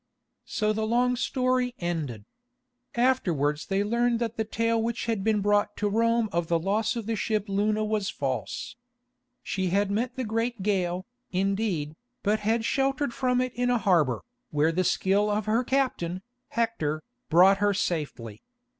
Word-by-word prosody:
So 215 -1 0
the 220 0 -1
long 250 +2 +2
story 255 0 0
ended. 150 - -3 0.7
Afterwards 170 - +1
they 195 +1 +1
learned 235 +2 +1
that 230 -1 -2
the 225 - 0
tale 230 +1 0
which 235 +1 -2
had 225 -4 -1
been 215 -1 +2
brought 205 0 +1
to 210 - 0
Rome 230 +2 +2
of 170 -1 -1
the 170 - +2
loss 205 +7 0
of 230 -3 -4
the 225 +1 -1
ship 215 -1 -1
Luna 210 +2 +1
was 210 -2 -1
false. 135 - -3 0.7
She 190 -1 -1
had 200 +2 +1
met 240 +4 -1
the 260 - -2
great 225 -1 -2
gale, 185 -2 0 0.2
indeed, 190 -5 -1 0.3
but 215 +1 +2
had 225 +2 0
sheltered 275 0 0
from 250 0 +1
it 255 -1 -2
in 245 0 0
a 245 - +3
harbour, 170 - +2 0.3
where 150 +2 +2
the 185 +3 +1
skill 200 +3 +2
of 210 -1 0
her 225 +3 +2
captain, 240 -10 -1 0.2
Hector, 160 -10 -1 0.3
brought 185 +4 +6
her 205 0 +3
safely. 145 - -3
210 Hz, 165 wpm, -27 LUFS, 185-235 Hz, 0.7 s, brought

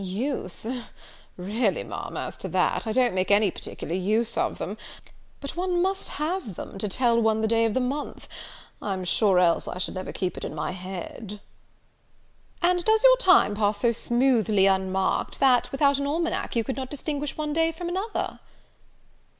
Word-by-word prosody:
"Use! 200 +1 -3 0.7
really, 205 +3 0
Ma'am, - - -6
as - - -4
to - - -5
that, - - 0
I - - 0
don't 245 0 +2
make 185 0 0
any 205 -1 +4
particular 165 - -6
use 215 +5 0
of - - 0
them; - - -4 0.6
but 280 - -6
one 360 0 0
must 385 +2 0
have 305 - -2
them, 195 - -8
to 210 - -1
tell 235 +2 +2
one 220 -1 +2
the 220 - +1
day 230 0 +3
of 225 - 0
the - - +3
month: 270 +4 -3 0.5
I'm 190 -3 -3
sure, 195 +1 +3
else 175 -2 +3
I - - -5
should 180 - -1
never 185 0 -5
keep 185 -2 -3
it - - -6
in - - -5
my - - -2
head." 190 +3 -7 1.2
"And 355 0 +3
does 440 +3 +3
your - - +8
time 375 - +5
pass 205 0 +1
so 230 +3 +2
smoothly 235 -4 +2
unmarked, 190 0 0
that, 260 -3 +4
without 280 0 +3
an 280 - -1
almanack, 330 0 -1
you 230 - +2
could 265 +3 -4
not 260 -1 -4
distinguish 290 0 -4
one 300 -1 -2
day 325 +1 +2
from 340 +2 -6
another?" 385 +5 -3
235 Hz, 180 wpm, -26 LUFS, 195-295 Hz, 1.2 s, your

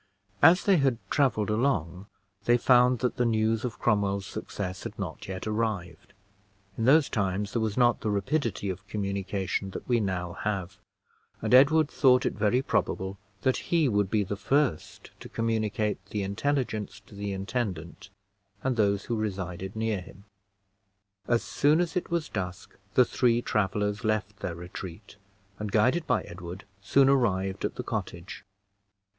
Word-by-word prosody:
As 180 +3 +7
they 195 -3 +4
had 135 -5 +2
traveled 125 -8 +2
along, 100 - 0 0.4
they 120 0 +5
found 125 0 +5
that 125 - 0
the 125 - +2
news 110 0 +1
of 120 -5 -4
Cromwell's 100 -3 +1
success 95 -1 -5
had - - -7
not - - -6
yet 95 -1 -5
arrived: 105 -5 -3 0.6
in 115 - -1
those 145 +3 +6
times 100 0 -1
there 115 - 0
was 110 -2 -1
not 120 -1 +4
the 110 - -1
rapidity 105 +2 -1
of 95 +3 -9
communication 100 -1 -2
that - - -8
we 120 -2 +3
now 90 -4 -2
have, 95 -2 -3 0.6
and - - -1
Edward 145 +4 +6
thought 130 -3 +4
it - - 0
very 110 +5 +1
probable 95 -6 -1 0.2
that 130 - +2
he 165 -4 +3
would 105 -4 +1
be 105 0 +2
the 100 +1 -3
first 125 - -1
to - - -10
communicate 110 -3 -1
the 105 0 -3
intelligence 110 -1 -2
to 105 - -19
the 100 0 -4
intendant 95 -3 -4 0.5
and 130 -2 0
those 100 -2 +2
who 120 - -1
resided 95 -3 -4
near 110 -3 -1
him. 95 +2 -14 1.0
As 120 -1 +2
soon 150 +3 +2
as 175 0 -1
it 180 - -1
was 170 -2 -1
dusk 90 -3 -5 0.2
the 125 - +6
three 120 0 +2
travelers 105 0 0
left 105 -2 -1
their 85 - -4
retreat, 90 +3 -9 0.4
and, 105 -1 -4
guided 125 +11 +2
by - - +2
Edward, 90 +2 -9 0.2
soon 135 +7 +4
arrived 100 -8 +1
at - - -3
the - - -4
cottage. 95 +5 -5
105 Hz, 160 wpm, -28 LUFS, 95-125 Hz, 1.0 s, As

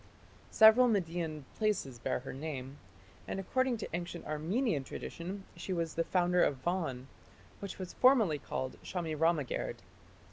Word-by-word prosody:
Several 220 +3 +7
Median 165 - -1
places 200 - -1
bear 130 +1 -1
her 135 - -7
name, 135 -1 -6 0.5
and - - -3
according 255 +6 +1
to 215 - -5
ancient 175 0 -5
Armenian 160 - 0
tradition 185 +8 -6
she 190 - -4
was 165 -2 -1
the 165 - +1
founder 180 -1 +2
of 140 - +2
Van, 160 -8 -1 0.5
which 200 -2 -6
was 185 -2 -6
formerly 225 - +4
called 130 -1 -4
"Shamiramagerd". 160 -4 -1
170 Hz, 135 wpm, -33 LUFS, 150-195 Hz, 0.5 s, Several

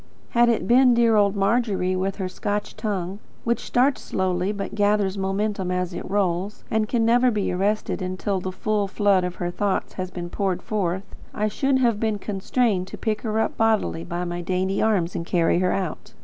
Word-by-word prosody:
Had 240 0 +4
it 220 -5 0
been 250 +1 +6
dear 230 -1 +4
old 205 -1 +3
Margery 195 -3 +1
with 190 +1 -1
her 190 -3 -3
Scotch 205 +2 -3
tongue, 195 -3 -3 0.2
which 235 0 +1
starts 260 +3 +1
slowly, 185 0 -1
but 200 -1 -5
gathers 205 -2 +2
momentum 195 0 -1
as 180 0 -1
it - - -6
rolls, 195 0 -1
and 220 -1 +1
can 230 -2 +2
never 245 +2 +4
be 210 -4 -1
arrested 200 +3 -1
until 185 +2 -2
the 185 +1 -4
full 205 +2 -1
flood 200 -2 +2
of 180 0 -3
her 175 0 -3
thought 200 +1 -1
has 185 -1 -3
been 175 -1 -6
poured 190 -3 -1
forth, 190 -4 -1 0.3
I 210 - +1
should 270 +5 +1
have 235 -5 +2
been 220 -2 0
constrained 200 0 0
to - - -8
pick 215 -1 -2
her 220 -1 -1
up 220 - 0
bodily 215 - +1
in 175 - -4
my 175 0 -3
dainty 185 +2 -1
arms 190 -6 +1
and - - -2
carry 170 0 +2
her 180 0 +2
out. 185 -5 -4
200 Hz, 195 wpm, -24 LUFS, 185-215 Hz, 0.3 s, been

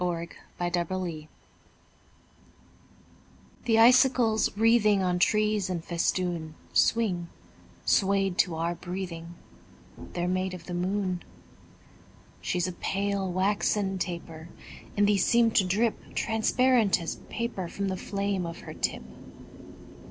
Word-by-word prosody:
SILVER 170 -1 -2 0.3
FILIGREE 175 -2 -2 2.4
The 225 -2 +3
icicles 240 -2 +5
wreathing 215 -3 +4
On 180 -1 +1
trees 210 0 +2
in 175 -3 -2
festoon 170 -1 -2 0.2
Swing, 185 -7 +2 0.6
swayed 195 -1 +2
to 175 -3 +2
our 165 +1 -1
breathing: 175 -2 -6 0.8
They're 175 0 -1
made 185 0 -1
of 170 - -11
the 180 - -6
moon. 185 0 -1 1.2
She's 180 -1 -1
a - - -3
pale, 195 +1 -2
waxen 195 +1 0
taper; 170 -2 -5 0.5
And 205 - +4
these 205 -3 +3
seem 235 -1 +4
to 200 - +4
drip 210 +5 +1 0.2
Transparent 230 0 +2
as 165 - -4
paper 230 -6 -3
From 200 +3 -3
the 190 - -2
flame 195 -1 -2
of 165 - -8
her - - -9
tip. - - -2
185 Hz, 115 wpm, -28 LUFS, 175-210 Hz, 2.4 s, icicles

